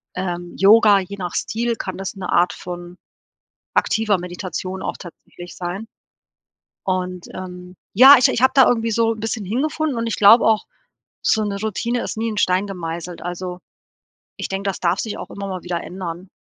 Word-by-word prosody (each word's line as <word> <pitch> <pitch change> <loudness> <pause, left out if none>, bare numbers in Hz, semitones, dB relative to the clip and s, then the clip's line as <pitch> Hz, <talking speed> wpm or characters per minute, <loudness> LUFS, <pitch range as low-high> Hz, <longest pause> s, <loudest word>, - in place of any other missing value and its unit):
ähm, 175 -1 -4
Yoga, 205 0 +6
je 195 +1 -6
nach 180 -3 -5
Stil, 235 +2 -1
kann 185 -4 -5
das 195 +2 -5
'ne 190 -2 -5
Art 175 0 +3
von 175 0 -8 0.8
aktiver 215 -2 +2
Meditation 185 +1 -5
auch - - -3
tatsächlich 175 0 -12
sein. 185 +5 -5 1.0
Und, 185 -1 -3
ähm, 180 -1 -9 0.2
ja, 265 +7 +9
ich 250 - +5
ich - - -1
habe 260 - +5
da 265 -2 +7
irgendwie 230 -1 +1
so 225 +1 +2
'n 220 - -11
bisschen 220 -1 -3
hingefunden 290 +6 -1
und 230 - -1
ich 225 - -2
glaube 210 +3 +7
auch, 220 -1 +3 0.6
so 220 - +2
'ne 200 -1 -3
Routine 235 +3 -1
ist - - -4
nie 225 +1 -1
in 215 - -5
Stein 185 +1 +2
gemeißelt. 175 -2 -6
Also, 180 +1 -5 0.8
ich - - -4
denke, 195 +1 -3
das - - -6
darf 175 +2 +1
sich 220 - -4
auch - - -8
immer 200 0 -6
mal 185 -2 -5
wieder 175 -1 -3
ändern. 180 0 -7
195 Hz, 185 wpm, -21 LUFS, 180-225 Hz, 1.0 s, ja